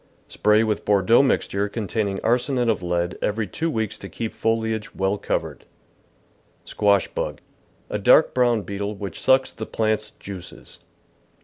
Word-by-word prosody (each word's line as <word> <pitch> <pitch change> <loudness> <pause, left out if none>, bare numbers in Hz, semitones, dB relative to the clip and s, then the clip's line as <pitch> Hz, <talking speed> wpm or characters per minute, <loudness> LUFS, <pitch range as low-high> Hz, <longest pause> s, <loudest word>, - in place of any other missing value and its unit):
Spray 105 +1 +3
with 110 -2 -1
Bordeaux 100 +4 +4
mixture 105 -6 0
containing 100 -2 -2
arsenate 125 0 +1
of 110 -5 +1
lead 85 0 -2
every 110 +1 0
two 160 - -3
weeks 110 -7 -2
to - - -8
keep 115 -2 -5
foliage 110 -1 -1
well 95 +1 0
covered. - - -3 1.0
Squash 100 -2 +2
Bug. - - -4 0.3
— - - -36
A - - -1
dark - - +5
brown 120 -4 +2
beetle 100 +1 -4
which 100 -4 -6
sucks 130 0 +3
the 110 - -6
plant's 110 -1 -1
juices. 100 -4 -10
105 Hz, 145 wpm, -23 LUFS, 100-115 Hz, 1.0 s, dark